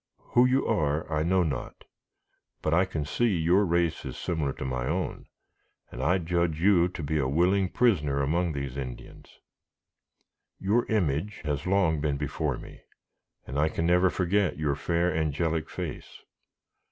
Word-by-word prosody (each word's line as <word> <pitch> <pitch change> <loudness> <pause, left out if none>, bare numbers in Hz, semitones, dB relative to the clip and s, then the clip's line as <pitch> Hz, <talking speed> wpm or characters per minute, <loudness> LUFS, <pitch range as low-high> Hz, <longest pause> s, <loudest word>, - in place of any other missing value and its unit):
Who 125 +1 +6
you 130 +2 +2
are 75 +1 0
I 75 - +1
know 90 +3 +2
not, 75 -5 -4 0.8
but 75 - +1
I 90 +3 +4
can 80 -5 -4
see 120 +11 +1
your 85 +5 +3
race 85 -3 0
is - - -6
similar 80 -5 -1
to - - -6
my 65 -1 -2
own, - - -3 0.6
and 85 +8 0
judge 85 -3 0
you 90 -1 +4
to 90 -3 -7
be 75 +2 0
a 65 - +1
willing 90 +6 +2
prisoner 75 - +2
among 85 +4 0
these 70 -2 -4
Indians. 65 -3 -8 1.2
Your 105 +5 +1
image 100 -1 -1
has 75 +1 -2
long 90 -6 +2
been 75 -2 0
before 70 -1 -2
me, - - -12 0.6
and 70 +3 -3
I 75 +1 +3
can 85 - -2
never 90 +2 +4
forget 95 +2 0
your 75 -2 0
fair, 85 +5 0
angelic 80 +1 -1
face. - - -7
80 Hz, 155 wpm, -27 LUFS, 75-90 Hz, 1.2 s, Who